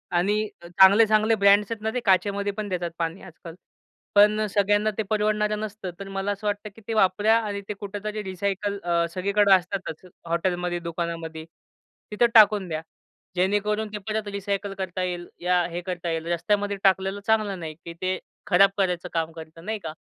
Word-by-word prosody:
आणि 210 +4 +1
अ, 170 - -11
चांगले-चांगले 215 +5 +5
ब्रँड्स 200 +1 +4
आहेत 225 - -4
ना, 220 - 0
ते 250 - 0
काचेमध्ये 200 +1 +2
पण 205 0 -5
देतात 175 -2 -2
पाणी 165 +2 -2
आजकाल. 165 -2 -11 0.6
पण 210 +1 +6
अ, 215 - 0
सगळ्यांना 205 +1 +2
ते 220 - 0
परवडणारं 210 0 +1
नसतं. 210 -3 -5
तर 200 - -7
मला 195 +1 -2
असं 205 +1 -4
वाटतं, 205 +1 -2
की 225 - -15
ते 225 - -2
वापरा 210 +2 +3
आणि 205 -2 -4
ते - - -1
कुठेतरी 210 +1 -5
रिसायकल 200 +1 -2
अ, 170 -1 +1
सगळीकडं 200 +2 +2
असतातच 180 -2 -6 0.2
हॉटेलमध्ये, 175 +1 -1
दुकानामध्ये 165 -1 -5 0.7
तिथं 210 +3 +3
टाकून 210 -3 +6
द्या. 155 -2 -3 0.5
जेणेकरून 205 +4 +1
ते - - -2
परत 215 -1 -2
रिसायकल 200 0 -3
करता 185 -1 -3
येईल, 175 -1 -4
या 180 0 +2
हे 175 +1 -4
करता 180 -1 -4
येईल. 165 0 -3
रस्त्यामध्ये 200 +4 0
टाकलेलं 190 +1 +2
चांगलं 215 -4 +1
नाही, 160 -2 -6
की 170 - -7
ते 185 0 0 0.3
खराब 195 0 +6
करायचं 180 -2 0
काम 165 -1 -1
करतं 160 +1 -12
नाही 220 -1 -3
का. 160 -4 -6
195 Hz, 175 wpm, -25 LUFS, 175-210 Hz, 0.7 s, पण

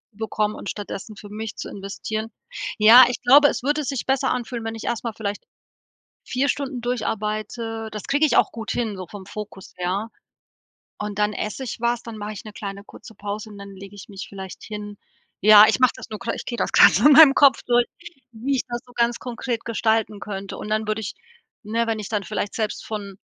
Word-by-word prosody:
bekommen 215 0 -2
und - - -6
stattdessen 205 +1 -7
für 205 0 -11
mich 215 +1 -6
zu - - -6
investieren.“ 215 +3 -5 0.5
Ja, 230 +4 +10
ich 250 - -4
glaube, 280 +4 +7
es - - -3
würde 295 +2 +1
sich 275 -2 -3
besser 270 0 +1
anfühlen, 240 -2 -4
wenn 225 0 -4
ich 225 - -8
erst 235 - -2
mal 230 - -2
vielleicht 205 -2 -4 0.8
4 270 +3 0
Stunden 265 -3 -2
durcharbeite. 225 -1 -3
Das 210 -1 -6
kriege 285 +3 +3
ich 300 - +2
auch - - +4
gut 225 -2 -5
hin, 220 -5 -2
so 185 - -6
vom 195 +1 -10
Fokus 210 -2 -9
her, 185 +5 -2 0.9
und 210 -1 -5
dann 210 0 +2
esse 215 +5 -4
ich 245 - -5
was, 235 0 0
dann 230 -2 -8
mache 210 +1 -5
ich 200 - -8
'ne 215 - -9
kleine 200 -1 -7
kurze 220 - -14
Pause 205 +1 -5
und 205 - -11
dann 200 0 -10
lege 195 +1 -11
ich 200 - -11
mich 200 +2 -7
vielleicht 190 -2 -9
hin. 205 -1 -7 0.4
Ja, 210 +1 +9
ich - - +1
mache 255 - +6
das - - -10
nur 215 - -5
gra 230 +1 -3
ich - - -7
gehe 235 - -5
das - - -1
grad - - +8
so - - +3
in 295 - +9
meinem 295 -2 +9
Kopf 275 -2 +5
durch, 240 0 +3 0.5
wie 260 +5 -1
ich - - 0
das 240 0 -3
so 245 - -17
ganz 235 0 +1
konkret 240 -1 -4
gestalten 220 -2 0
könnte, 195 -2 -6
und - - -6
dann 215 0 0
würde 215 +1 0
ich 200 - -5 0.5
ne, 230 +2 0
wenn 225 -1 -1
ich 210 - -6
dann 210 -2 -2
vielleicht 200 +3 -3
selbst 215 -2 -3
von 200 -3 -6
220 Hz, 220 wpm, -23 LUFS, 205-240 Hz, 0.9 s, Ja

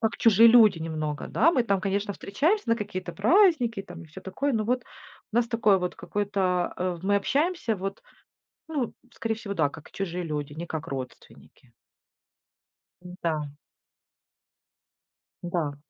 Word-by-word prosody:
как 220 -1 0
чужие 230 -1 +6
люди 220 -6 +7
немного. 155 -2 -4
Да, 330 - +3
мы 255 - +3
там, 200 -4 0
конечно, 200 +1 -1
встречаемся 285 - 0
на 230 - +3
какие-то 185 -5 -5
праздники 245 - +3
там 175 -2 -11
и - - -13
всё 160 +5 -11
такое. 235 +10 -2
Но 220 -3 0
вот 250 +2 0 0.5
нас 235 +1 +2
такое 220 -4 +3
вот 180 0 -3
какое-то, 205 -1 -3 0.4
э, 180 -1 -2
мы 200 +1 +2
общаемся 280 - 0
вот, 195 +2 -5 0.7
ну, 285 -7 -2 0.2
скорее 225 -1 -3
всего, 215 -2 -6
да, 155 -6 +2
как 160 +2 -13
чужие 180 -2 -4
люди, 150 -2 -4
не 165 +3 -6
как 160 -1 -5
родственники. 130 -1 -9 1.3
М-да. 165 -5 -4 1.9
Да. 170 -5 -2
195 Hz, 145 wpm, -26 LUFS, 170-230 Hz, 1.9 s, люди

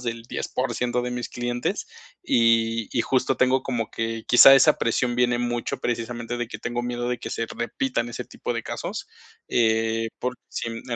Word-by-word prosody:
menos - - -11
del 115 -1 -3
10% 125 -2 -2
de 125 - -3
mis 125 0 -4
clientes, 120 0 -2 0.4
y 115 -1 +2
y - - +4
justo 130 +2 +1
tengo 130 +1 +3
como 120 -4 -2
que 115 0 -3
quizá 135 +2 +9
esa 135 - +5
presión 120 +1 0
viene 125 -1 +2
mucho 120 -1 -2
precisamente 120 0 -3
de 120 0 -2
tengo 120 +1 -3
miedo 120 0 -3
de 125 - 0
que - - -6
se 115 - -2
repitan 120 0 -2
ese - - -5
tipo - - -4
de - - -3
casos, - - -5 0.4
eh, 115 0 +1
por 125 0 -2 0.2
si, - - -3
en 115 0 -6
120 Hz, 180 wpm, -24 LUFS, 115-125 Hz, 0.4 s, quizá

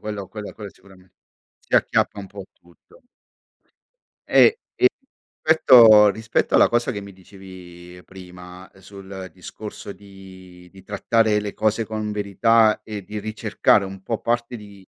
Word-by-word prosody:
Quello 105 -2 -6
quello 105 -1 -9
quello 105 -2 -10
sicurame 95 -2 -22 0.5
si - - -6
acchiappa 105 - 0
un 100 - -8
po' 100 0 -11
tutto. 85 - -25 1.2
Ehm, - - +6 0.3
e - - -13 0.6
petto 120 -9 +7
rispetto 110 +1 -2
alla - - +5
cosa 120 +2 0
che 105 - -6
mi 100 0 -12
dicevi 90 -2 -14
prima 90 -1 -13
sul 95 -1 -11
discorso 100 +3 -10
di 95 -3 -15
di 95 -1 -17
trattare 105 +2 0
le 105 -1 -6
cose 110 +1 -1
con 110 0 -5
verità 105 +2 +1
e 105 -2 -8
di 105 +3 -7
ricercare 105 -1 0
un 95 0 -10
po' 115 +2 -4
parte 120 +1 -2
di 100 -2 -15
100 Hz, 140 wpm, -21 LUFS, 95-110 Hz, 1.2 s, petto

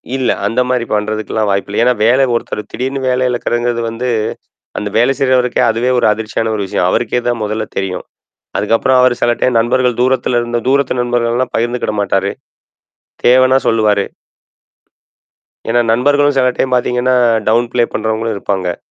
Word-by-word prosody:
இல்ல, 130 -2 0 0.2
அந்த 115 +5 +1
மாரி 125 -2 0
பண்றதுக்கல்லாம் 110 0 -1
வாய்ப்பு 100 +1 -1
இல்ல. 105 - 0
ஏன்னா, 125 +1 +4
வேலை 130 +4 +4
ஒருத்தர் 115 -2 -2
திடீர்ன்னு 135 +2 -3
வேலை 125 0 +1
இழக்குறதுங்கிறது 120 -1 -1
வந்து, 120 +2 -4 0.7
அந்த 105 - -3
வேலை 120 +4 +3
செய்றவருக்கே 125 -2 +2
அதுவே 115 +3 0
ஒரு - - +2
அதிர்ச்சியான 110 +1 -3
ஒரு 100 - -2
விஷயம். 90 -1 0
அவருக்கே 120 +3 0
தான் 120 -1 -1
முதல்ல 110 +1 -2
தெரியும். 95 -1 -3 0.5
அதுக்கப்புறம் 115 +5 +2
அவரு 125 -1 +4
சில 120 - +3
டைம் 125 -2 +2
நண்பர்கள், 125 +1 +1
தூரத்துல 130 -1 +1
இருந்து 120 0 -2
தூரத்து 140 -2 +1
நண்பர்கள்ல்லாம் 120 +1 -1
பகிர்ந்துகிட 120 -1 -1
மாட்டாரு. 100 0 0 0.9
தேவைன்னா 130 +1 +5
சொல்லுவாரு. 105 -3 +2 1.7
ஏன்னா 120 +1 +2
நண்பர்களும் 145 +4 +2
சில 130 -1 +3
டைம் 130 - 0
பார்த்தீங்கன்னா, 125 +1 +1 0.3
டவுன் 120 +2 +2
பிளே 120 - +3
பண்ணுறவங்களும் 110 0 -2
இருப்பாங்க. 95 -3 -2
120 Hz, 150 wpm, -15 LUFS, 110-125 Hz, 1.7 s, தேவைன்னா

